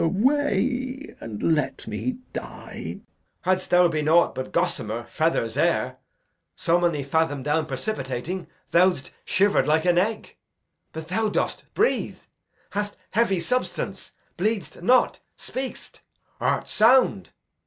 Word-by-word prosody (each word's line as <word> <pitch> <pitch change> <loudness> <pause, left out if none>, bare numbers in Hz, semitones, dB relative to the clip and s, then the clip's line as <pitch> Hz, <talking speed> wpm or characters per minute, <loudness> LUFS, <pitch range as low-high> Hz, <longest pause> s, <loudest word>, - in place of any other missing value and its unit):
Glou. - - +3
Away, 260 - 0
and 115 +9 -1
let 150 -3 -1
me 235 - -3 0.2
die. - - -7
Edg. - - -14 0.4
Hadst 185 0 0
thou 180 0 +6
been 155 -2 -1
aught 170 +2 +5
but 130 - -5
gossamer, - - -1
feathers, - - 0
air, - - +1 0.6
So 170 +1 +2
many 170 -5 +1
fadom 145 -1 0
down 150 +1 +1
precipitating, 140 - -3 0.2
Thou'dst 175 -5 +3
shiver'd 200 +1 +3
like 155 +3 +3
an 175 -1 +4
egg; 215 +3 -2 0.5
but 160 0 -7
thou 215 +4 +1
dost - - -1
breathe; 445 - +1 0.5
Hast 205 0 -3
heavy 200 -4 +2
substance; 250 +8 -2 0.3
bleed'st 210 -2 -1
not; 250 +8 +3 0.2
speak'st; 260 0 -6 0.4
art - - 0
sound. 250 +4 +4
180 Hz, 125 wpm, -25 LUFS, 160-225 Hz, 0.6 s, thou